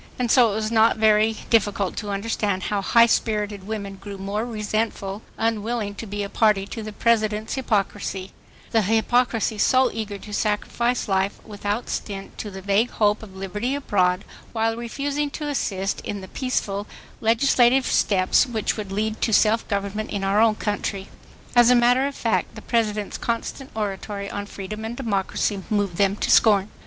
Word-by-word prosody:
And 245 -2 0
so 240 -4 +6
it - - -3
was 215 0 -2
not 225 0 +4
very 215 0 +3
difficult 205 -4 +2
to 210 - -4
understand 200 -1 -1
how 205 -1 -1
high 235 +4 +5
spirited 210 -3 -1
women 200 -3 -5
grew 200 +1 -8
more 200 +4 -3
resentful, 215 -2 -2 0.2
unwilling 225 -1 -1
to 220 +2 -8
be 205 +1 -3
a - - -3
party 210 -2 +2
to 225 +3 -6
the 215 0 -6
President's 215 0 +1
hypocrisy, 200 -6 -2 0.4
the 225 - +4
hypocrisy 225 +1 +1
so 255 +3 +4
eager 215 -2 -4
to 210 +1 -10
sacrifice 235 +4 0
life 195 0 0
without 205 +2 -3
stint 195 -2 -5
to 210 - -4
the 190 -1 -9
vague 205 +5 +2
hope 210 -1 +1
of 200 -4 -11
liberty 210 +7 -3
abroad, 185 -9 +1 0.3
while 225 0 +1
refusing 280 +5 -2
to 300 +1 -5
assist 195 -9 -2
in 205 -1 -5
the 190 - -9
peaceful 205 -6 -2 0.3
legislative 245 +2 +4
steps 190 +5 +3
which 225 -3 -1
would 205 -3 -5
lead 215 +2 -2
to 225 - +1
self 220 +1 +3
government 200 +1 -2
in 200 -1 -3
our 195 +2 +3
own 225 -1 +4
country. 205 -2 -3 0.5
As 240 0 +7
a 250 - +6
matter 245 +3 +4
of 280 - -6
fact 230 - -1
the 220 - -10
President's 215 -3 -1
constant 240 +3 -3
oratory 200 -1 -4
on 205 0 -5
freedom 210 +2 -7
and 230 +2 -5
democracy 200 -3 -1
moved 205 -5 0
them 200 -1 +3
to - - -1
scorn. 205 -2 +5
215 Hz, 170 wpm, -23 LUFS, 200-230 Hz, 0.5 s, As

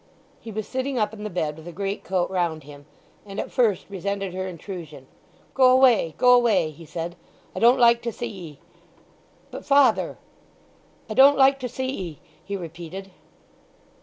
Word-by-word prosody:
He 225 - -9
was 215 0 -5
sitting 260 0 -3
up 210 -1 0
in 210 -1 -9
the 210 - -4
bed 155 -5 -2
with 160 +1 -13
a - - -6
greatcoat 195 -1 -2
round 170 -4 -1
him, 145 0 -14 0.4
and 200 0 -8
at - - -4
first 225 -7 +1
resented 195 -1 -4
her 185 0 -4
intrusion. 170 -6 -9 0.5
"Go 260 -1 +5
away—go 250 - +4
away," 215 -10 +3
he 160 +2 -14
said. 170 +2 -5 0.4
"I - - -3
don't 240 +3 +5
like 235 -1 +5
to 235 - -3
see 240 - -6
'ee!" 175 -10 -10 0.9
"But, - - -8
father—" 275 -5 +3 0.9
"I 215 - -5
don't 275 +5 +6
like 270 0 +5
to 250 -1 -4
see 260 +2 -4
'ee," 185 - -5 0.2
he 200 0 -4
repeated. 175 +2 -8
200 Hz, 165 wpm, -24 LUFS, 170-240 Hz, 0.9 s, don't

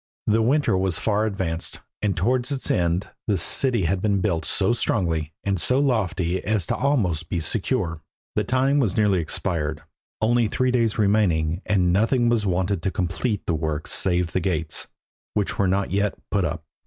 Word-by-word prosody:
The 110 +1 +3
winter 135 -1 +2
was 95 -2 +1
far 110 0 +1
advanced, 90 -5 -3 0.2
and 100 -2 0
towards 125 - +1
its 135 -2 -1
end 85 +2 0 0.2
the 105 -3 +2
city 115 +5 +2
had 90 +3 0
been 100 -2 +1
built 85 -5 0
so 95 +7 +2
strongly 85 -10 -1
and 95 -3 0
so 125 - +3
lofty 95 - 0
as 105 -4 0
to - - -1
be - - -8
almost 100 - +1 0.2
secure. 80 0 -1 0.3
The - - +1
time 135 +3 +2
was 115 -8 0
nearly 105 -4 +3
expired, 80 -1 -2 0.4
only 115 +1 +2
three 130 +4 0
days 115 -3 +1
remaining, 95 -6 +2
and 90 -4 +2
nothing 120 +4 +2
was 110 -3 +1
wanted 95 0 0
to 95 - 0
complete 95 +4 -2
the 85 - 0
work 80 -1 -2
save 90 -2 +1
the - - 0
gates, 85 -3 -2 0.5
which 105 -2 -1
were 100 - +3
not 95 +2 0
yet 100 +1 0
put 100 -3 +1
up. 80 - -3
100 Hz, 180 wpm, -23 LUFS, 85-110 Hz, 0.5 s, The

